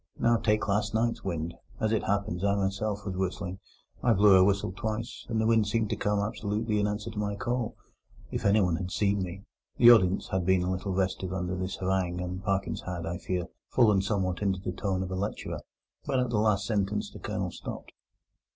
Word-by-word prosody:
Now, 115 0 +3
take 105 -1 +1
last 105 +1 0
night's 115 +1 0
wind: 85 -3 -3 0.3
as 110 - +1
it 110 - +1
happens, 100 -3 -1
I 100 0 +3
myself 100 +1 -1
was 95 -2 -3
whistling. 95 0 -3 0.4
I 120 - +4
blew 100 -1 +6
a 95 - +7
whistle 100 -1 +2
twice, 110 +3 -4
and 115 -2 0
the 110 - +2
wind 110 -2 +3
seemed 110 0 0
to - - +1
come 105 0 0
absolutely 105 +1 -1
in 105 - +2
answer 105 +2 -3
to 105 - -5
my 105 -1 -1
call. 120 +2 -2 0.6
If - - -3
anyone 100 -5 +3
had 90 0 -4
seen 100 0 +1
me—" 95 +1 -5 0.3
The 120 0 +9
audience 95 -5 +4
had 95 -1 0
been 95 0 +3
a 90 - 0
little 95 +1 -2
restive 95 -1 -1
under 90 -1 -2
this 95 +1 -3
harangue, 95 -2 -1
and 90 +1 -4
Parkins 95 -1 -1
had, 85 -2 -3
I 85 +1 -3
fear, 90 -2 -2 0.2
fallen 105 -6 +4
somewhat 95 -3 -1
into 95 -2 +1
the 90 - -3
tone 95 0 -1
of 95 - -5
a - - -2
lecturer; 100 +3 -3 0.5
but 130 - +1
at 125 -1 0
the 105 - +2
last 105 -2 +2
sentence 105 -1 -1
the - - -10
Colonel - - -3
stopped. - - -8
100 Hz, 210 wpm, -29 LUFS, 95-105 Hz, 0.6 s, The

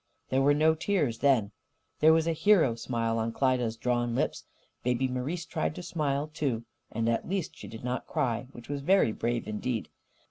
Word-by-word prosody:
There 130 +1 +2
were 145 +1 +4
no 155 +2 +4
tears, 155 - 0
then. 130 -8 +3 0.5
There 155 +1 +7
was 160 0 +4
a 165 - +1
hero 165 - +4
smile 115 -1 -1
on 115 +1 -1
Klyda's 125 -3 +1
drawn 120 0 0
lips. - - -1 0.4
Baby 125 +1 +1
Marise 135 +7 -3
tried 80 0 -2
to 90 - -7
smile, 145 -2 -1
too. 130 -8 -1 0.3
And 115 0 -1
at 115 +6 0
least 190 -3 -2
she - - -10
did 115 +1 -9
not 125 +1 -3
cry 125 -6 -1
which 120 -3 -12
was 145 -1 -3
very 185 - +4
brave 120 +2 -2
indeed. 110 +2 -3
125 Hz, 185 wpm, -29 LUFS, 115-150 Hz, 0.5 s, There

